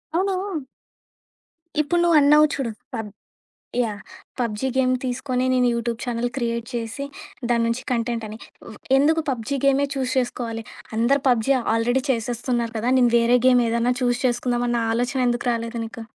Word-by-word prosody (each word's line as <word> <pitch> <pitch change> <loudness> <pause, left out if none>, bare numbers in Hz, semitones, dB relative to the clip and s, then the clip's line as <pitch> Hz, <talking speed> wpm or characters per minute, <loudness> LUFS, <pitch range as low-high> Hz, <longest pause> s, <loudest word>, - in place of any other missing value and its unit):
అవును 375 -4 -1 1.2
ఇప్పుడు 345 +4 0
నువ్వు 340 -2 +5
అన్నావు 300 +2 +6
చూడు, 255 -5 -2 0.2
పబ్ 220 -2 -4 0.8
యాహ్! 210 -3 -4 0.4
పబ్‌జీ 235 +1 -1
గేమ్ 255 -1 +3
తీసుకొని 255 0 -1
నేను 250 -1 +3
యూట్యూబ్ 235 0 -3
ఛానెల్ 240 0 -1
క్రియేట్ 235 -1 -2
చేసి, 230 +3 -4 0.5
దాని 235 -1 +2
నుంచి 230 +2 -1
కంటెంట్ 235 -1 -1
అని. 215 +1 -8 0.6
ఎందుకు 320 +3 +3
పబ్‌జీ 260 +2 -2
గేమే 275 +1 +4
చూజ్ 260 -2 -2
చేసుకోవాలి? 235 -2 -2 0.3
అందరూ 265 +4 +3
పబ్‌జీ 245 +2 +3 0.2
ఆల్రెడీ 245 +3 +1
చేసేస్తున్నారు 235 0 -2
కదా! 235 +4 0
నేను 240 -1 +4
వేరే 235 +1 +4
గేమ్ 250 -1 +5
ఏదైనా 235 +2 +1
చూజ్ 245 0 +1
చేసుకుందాం 245 0 0
అన్న 235 -1 +1
ఆలోచనెందుకు 245 0 0
రాలేదు 230 0 -3
నీకు? 225 0 -8
245 Hz, 145 wpm, -23 LUFS, 230-265 Hz, 1.2 s, అన్నావు